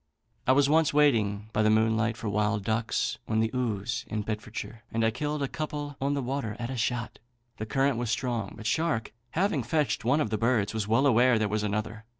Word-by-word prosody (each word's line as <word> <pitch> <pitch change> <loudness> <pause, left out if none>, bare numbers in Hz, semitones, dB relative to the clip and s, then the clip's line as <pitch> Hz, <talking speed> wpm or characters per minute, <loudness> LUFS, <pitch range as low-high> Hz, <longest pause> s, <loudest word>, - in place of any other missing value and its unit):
"I - - +6
was 140 +1 +4
once 155 0 +3
waiting 110 -8 +2
by 105 - +2
moonlight 110 +1 +2
for 115 - -5
wild 105 0 0
ducks 110 +1 -1
on 110 0 +1
the 110 0 +1
Ouze 115 -3 -2
in 105 -1 -3
Bedfordshire, 110 +1 -5
and 115 0 +1
I 115 - +3
killed 150 +4 -2
a - - 0
couple 145 0 -4
on 140 +1 +1
the 140 - -2
water 125 -4 -3
at 120 +1 -4
a - - -3
shot. 120 -1 -2 0.4
The 110 - -5
current 135 +1 +1
was 120 -2 -2
strong; 115 -4 -2
but 110 - -9
Shark, 115 -4 0 0.2
having 170 -5 +1
fetched 140 +1 0
one 130 +6 +3
of 115 -8 -1
the 110 - 0
birds, 115 -3 +1
was 110 -2 -2
well 115 +6 +3
aware 125 -2 +5
there 110 -1 +1
was 105 +1 -1
another. 105 +1 -3
115 Hz, 210 wpm, -28 LUFS, 110-135 Hz, 0.4 s, I